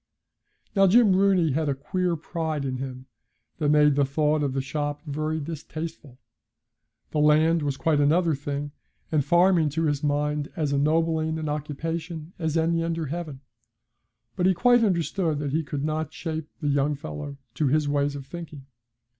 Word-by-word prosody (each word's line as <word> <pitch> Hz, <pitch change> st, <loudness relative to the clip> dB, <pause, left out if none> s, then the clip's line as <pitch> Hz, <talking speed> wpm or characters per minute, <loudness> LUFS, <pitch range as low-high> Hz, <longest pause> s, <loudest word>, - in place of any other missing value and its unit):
Now 195 Hz, -1 st, +6 dB
Jim 205 Hz, -1 st, +5 dB
Rooney 190 Hz, -5 st, +3 dB
had 155 Hz, +2 st, 0 dB
a 140 Hz, -, 0 dB
queer 180 Hz, +5 st, -1 dB
pride 160 Hz, -2 st, -3 dB
in 130 Hz, -1 st, -2 dB
him 130 Hz, -1 st, -6 dB, 0.5 s
that 150 Hz, -2 st, +1 dB
made 150 Hz, -1 st, +5 dB
the 140 Hz, +1 st, +2 dB
thought 150 Hz, +2 st, +1 dB
of 140 Hz, -3 st, -1 dB
the 135 Hz, -, -1 dB
shop 145 Hz, +2 st, -3 dB
very 155 Hz, +1 st, -2 dB
distasteful. 155 Hz, -2 st, -7 dB, 0.9 s
The 150 Hz, -, 0 dB
land 155 Hz, +2 st, +4 dB
was 140 Hz, -2 st, -2 dB
quite 155 Hz, -1 st, +1 dB
another 165 Hz, +3 st, +3 dB
thing, 145 Hz, +1 st, -4 dB, 0.4 s
and 155 Hz, -3 st, +2 dB
farming, 175 Hz, +1 st, +4 dB
to 160 Hz, +3 st, -2 dB
his 145 Hz, -2 st, 0 dB
mind, 145 Hz, 0 st, 0 dB
as 150 Hz, -3 st, -1 dB
ennobling 160 Hz, +2 st, +1 dB
an 155 Hz, -1 st, -4 dB
occupation 160 Hz, +3 st, -4 dB
as 160 Hz, -1 st, 0 dB
any 165 Hz, +1 st, +1 dB
under 165 Hz, -1 st, -2 dB
heaven. 150 Hz, -2 st, -5 dB, 0.9 s
But 180 Hz, -, +2 dB
he 190 Hz, -, +3 dB
quite 245 Hz, +5 st, +4 dB
understood 170 Hz, -4 st, 0 dB
that 145 Hz, -1 st, -3 dB
he 160 Hz, +3 st, +1 dB
could 145 Hz, -1 st, -4 dB
not 155 Hz, 0 st, -2 dB
shape 160 Hz, -2 st, -5 dB
the 145 Hz, -, 0 dB
young 145 Hz, +1 st, +1 dB
fellow 135 Hz, -, -7 dB, 0.2 s
to 140 Hz, +4 st, 0 dB
his 150 Hz, +2 st, +2 dB
ways 145 Hz, 0 st, 0 dB
of 140 Hz, -2 st, -7 dB
thinking. 155 Hz, -2 st, -9 dB
155 Hz, 170 wpm, -25 LUFS, 145-165 Hz, 0.9 s, Now